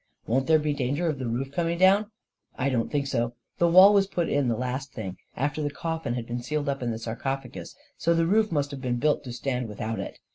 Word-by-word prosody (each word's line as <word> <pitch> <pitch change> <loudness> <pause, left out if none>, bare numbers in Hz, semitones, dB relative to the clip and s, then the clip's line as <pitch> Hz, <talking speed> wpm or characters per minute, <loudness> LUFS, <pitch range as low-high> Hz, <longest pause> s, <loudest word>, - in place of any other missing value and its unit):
"Won't 130 +3 0
there 160 -1 +6
be 150 -1 0
danger 145 +4 -1
of 150 -4 -1
the 130 - -3
roof 130 +4 -2
coming 170 +3 -1
down?" 190 +4 +5 0.5
44 - - -2
1 140 - +2
don't 115 -3 0
think 145 -2 0
so. 120 -3 -1 0.2
The 170 - +4
wall 185 +4 +8
was 200 -1 +4
put 175 -3 -1
in 140 -2 +1
the 115 -2 0
last 130 +1 -3
thing, 95 -6 -6 0.2
after 145 +3 -1
the 145 - 0
coffin 160 -4 -3
had 120 -2 -4
been 120 +1 -4
sealed 150 +3 -2
up 135 -1 -2
in 120 - -1
the 115 - -2
sarcophagus, 130 +4 -5 0.2
so 170 +1 +2
the 165 0 +2
roof 215 +4 +2
must 145 -2 0
have 140 -2 -7
been 125 -2 -1
built 150 +4 +1
to 125 - -6
stand 125 0 -2
without 110 +1 -4
it. 100 - -6
135 Hz, 250 wpm, -26 LUFS, 120-160 Hz, 0.5 s, wall